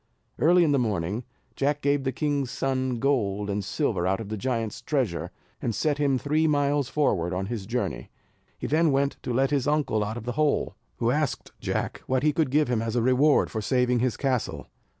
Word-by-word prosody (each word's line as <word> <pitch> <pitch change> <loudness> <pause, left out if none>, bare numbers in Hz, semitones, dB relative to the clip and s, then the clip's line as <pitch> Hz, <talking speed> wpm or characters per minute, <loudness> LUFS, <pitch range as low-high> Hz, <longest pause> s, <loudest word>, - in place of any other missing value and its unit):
Early 175 +3 +5
in 155 - +3
the 140 - +3
morning, 105 -1 -1 0.3
Jack 145 +1 0
gave 140 -1 +1
the 130 - +1
king's 140 -1 -1
son 130 -1 -1
gold 105 -6 0
and 100 0 -2
silver 90 -1 -1
out 95 +2 +1
of 110 -3 -6
the 110 - -2
giant's 115 -1 -2
treasure, 125 - -1 0.3
and 115 - -1
set 145 +3 0
him 140 -2 +2
three 155 +4 +1
miles 145 -2 +1
forward 90 - +1
on 95 +1 -2
his 105 -2 -5
journey. 120 +2 -3 0.5
He - - -6
then 160 +1 +3
went 140 +1 +1
to - - -4
let 135 +3 +2
his 140 -2 +1
uncle 145 -8 +1
out 110 +3 -4
of 115 - -7
the 125 - -2
hole, 150 +4 0 0.2
who 115 +1 +1
asked 150 +2 -1
Jack - - -3
what 130 0 +1
he 150 -1 +3
should 160 -5 +2
give 150 +3 +3
him 120 -3 0
as 115 0 -2
a 120 - +2
reward 130 +4 +3
for 110 - -2
saving 125 +1 +2
his 125 -3 0
castle. 130 -4 -1
130 Hz, 210 wpm, -26 LUFS, 115-145 Hz, 0.5 s, Early